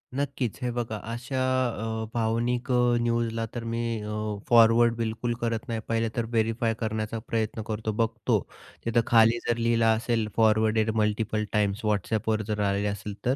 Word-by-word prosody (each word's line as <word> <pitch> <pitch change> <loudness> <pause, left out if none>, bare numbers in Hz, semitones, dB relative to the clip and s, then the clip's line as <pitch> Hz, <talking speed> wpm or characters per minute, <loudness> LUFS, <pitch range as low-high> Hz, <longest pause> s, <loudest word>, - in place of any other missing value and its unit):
नक्कीच. 135 -4 -2
हे 125 - 0
बघा 120 -2 -3 0.2
अशा 125 +3 -4 0.6
अ, - - -3
भावनिक 120 +2 0
अ, 125 -1 +3
न्यूजला 115 -1 0
तर 120 - -4
मी 115 - -2 0.2
अ, 105 0 -5 0.4
फॉरवर्ड 115 0 +6
बिलकुल 115 +1 -2
करत 115 +2 -2
नाही. 115 -1 -1
पहिले 115 0 0
तर 120 -2 0
व्हेरिफाय 115 +1 +1
करण्याचा 110 0 -2
प्रयत्न 110 -1 -1
करतो, 110 0 -2
बघतो. 115 0 +1 0.5
तिथं 115 0 +3
खाली 115 0 +5
जर 120 - +1
लिहिला 115 -1 +3
असेल 115 -1 0
फॉरवर्डेड 110 0 +3
मल्टिपल 110 0 0
टाईम्स, 105 +1 0
WhatsAppवर 110 +1 0
जर 105 -1 -2
आलेले 100 +1 0
असेल 100 0 -4
तर. 125 +2 +2
115 Hz, 155 wpm, -27 LUFS, 110-120 Hz, 0.6 s, फॉरवर्ड